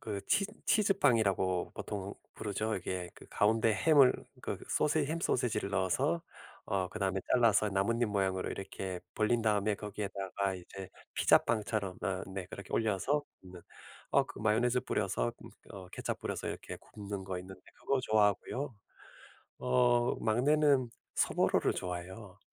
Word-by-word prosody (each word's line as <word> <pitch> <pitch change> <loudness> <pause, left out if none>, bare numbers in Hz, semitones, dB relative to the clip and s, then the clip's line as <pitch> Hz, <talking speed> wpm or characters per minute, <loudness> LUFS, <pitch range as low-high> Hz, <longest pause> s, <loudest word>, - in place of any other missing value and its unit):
그 100 -3 -4
치 200 - +3 0.2
치즈빵이라고 115 - +2
보통 100 -1 -5 0.2
부르죠. 105 +1 -2
이게 90 -1 -3
그 - - -14
가운데 110 +1 +3
햄을 135 +4 +6 0.3
그 - - -4
소세 150 0 +2
햄 165 +2 -2
소시지를 110 -8 0
넣어서 115 - +1 0.4
어 95 -2 -1
그다음에 95 -2 -1
잘라서 110 -4 +4
나뭇잎 110 +5 +1
모양으로 95 -2 0
이렇게 95 -1 -5 0.2
벌린 110 +2 +2
다음에 105 -1 +2
거기에다가 100 -2 -3
이제 95 +1 -9 0.3
피자빵처럼 105 -4 +2
어 95 -1 -1
네 95 -2 -4
그렇게 100 - -9
올려서 110 +7 +1 0.2
굽는 90 -2 -12 0.5
어 - - +4
그 - - -10
마요네즈 120 +4 +2
뿌려서 - - -1
음 - - -10 0.2
어 95 -2 -9
케첩 - - -4
뿌려서 - - -4
이렇게 - - -6
굽는 100 -2 -7
거 95 -1 -4
있는데 95 +1 -10 0.2
그거 135 -1 0
좋아하고요 110 +5 +1 0.8
어 125 -1 +3
막내는 130 +3 +3 0.3
소보로를 - - +2
좋아해요. 90 +3 -6
105 Hz, 320 characters per minute, -32 LUFS, 95-120 Hz, 0.8 s, 햄을